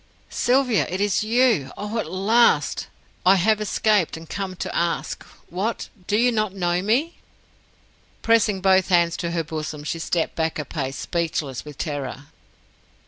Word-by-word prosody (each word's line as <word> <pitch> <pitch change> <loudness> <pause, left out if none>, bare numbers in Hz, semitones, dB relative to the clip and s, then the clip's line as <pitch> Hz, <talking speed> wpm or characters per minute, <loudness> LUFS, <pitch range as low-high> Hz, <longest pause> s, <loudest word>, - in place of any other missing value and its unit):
"Sylvia! 250 -3 +2
It 185 - -3
is 205 0 +1
you! 225 - +2
Oh, 210 +3 -3
at - - -4
last! 195 - +2 0.4
I 185 +2 +6
have 215 +3 +2
escaped, 210 -4 +1
and 165 0 -11
come 195 0 -4
to - - -5
ask 170 0 -1 0.3
What? 200 +6 -3 0.2
Do 210 - +2
you 245 +2 +4
not 215 -4 -1
know 175 -1 0
me?" 255 - 0 1.0
Pressing 220 -4 +3
both 190 -1 +4
hands 170 -2 +3
to 170 - -3
her 170 -1 -1
bosom, 155 -1 -5
she 165 +2 -3
stepped 165 0 -1
back 160 -1 -1
a 150 - -3
pace, 135 -3 -4
speechless 160 -6 -2
with 150 -2 -10
terror. 140 -3 -4
185 Hz, 155 wpm, -23 LUFS, 160-215 Hz, 1.0 s, I